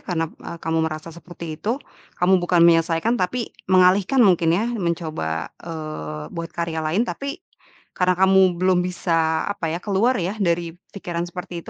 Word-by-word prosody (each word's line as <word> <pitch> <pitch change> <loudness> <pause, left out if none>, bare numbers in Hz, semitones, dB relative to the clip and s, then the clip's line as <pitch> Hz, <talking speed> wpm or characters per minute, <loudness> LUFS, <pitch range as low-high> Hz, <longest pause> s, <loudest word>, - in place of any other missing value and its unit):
karena 165 -3 -1
m 170 - -10
kamu 160 0 -1
merasa 155 +1 -5
seperti 170 -2 -8
itu, 230 +4 0 0.4
kamu 180 +1 +4
bukan 175 0 +2
menyelesaikan 165 +6 +3
tapi 230 +6 -2 0.2
mengalihkan 185 +7 +4
mungkin 175 -4 +4
ya, 215 - 0
mencoba, 160 - -3
eee, 155 - -6
buat 165 0 -5
karya 170 -1 -3
lain, 180 +10 +1
tapi 280 +5 -5 0.6
karena 180 0 +3
kamu 190 -1 +4
belum 185 -1 +3
bisa, 165 -3 0
apa 200 -5 -2
ya, - - -1
keluar 215 +5 +2
ya 180 +3 -1
dari 170 -2 0 0.2
pikiran 170 -3 -3
seperti 175 -1 -7
itu, - - -9
175 Hz, 160 wpm, -22 LUFS, 165-190 Hz, 0.6 s, kamu